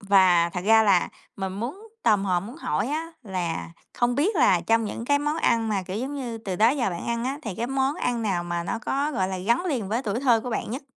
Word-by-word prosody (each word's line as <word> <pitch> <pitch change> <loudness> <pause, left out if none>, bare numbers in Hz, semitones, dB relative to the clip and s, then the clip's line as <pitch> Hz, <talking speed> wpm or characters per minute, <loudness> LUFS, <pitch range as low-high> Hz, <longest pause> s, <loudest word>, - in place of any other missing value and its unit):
và 185 -4 +4
thật 180 - -3
ra 220 +1 +6
là 195 -4 +3 0.3
mình 190 -1 -3
muốn 275 - -6
tò 215 -2 +5
mò 185 -3 0
muốn 230 - -9
hỏi 205 - -1
á 325 +3 -3
là 180 -6 -3 0.2
không 240 0 +1
biết 345 - +1
là 185 - +4
trong 225 0 +3
những 230 +2 -5
cái 285 +2 +3
món 295 +2 -1
ăn 230 -7 +2
mà, 200 -3 0
kiểu 185 +2 -5
giống 270 +4 -4
như, 245 -5 -4
từ 195 -5 -4
đó 225 +4 +5
giờ 250 -8 0
bạn 170 - -5
ăn 235 0 -1
á, 275 +3 -2
thì 210 -5 -4
cái 235 - -2
món 270 +2 0
ăn 240 -2 -1
nào 180 -5 0
mà 175 0 -2
nó 200 - -3
có, 280 +5 -1
gọi 190 -7 0
là, 190 -1 -3
gắn 235 - +1
liền 250 - -1
với 230 +5 -1
tuổi 220 +2 -2
thơ 240 -5 +4
của 245 +2 -5
bạn 220 - -3
nhất? 260 +5 -4
225 Hz, 265 wpm, -25 LUFS, 190-265 Hz, 0.3 s, ra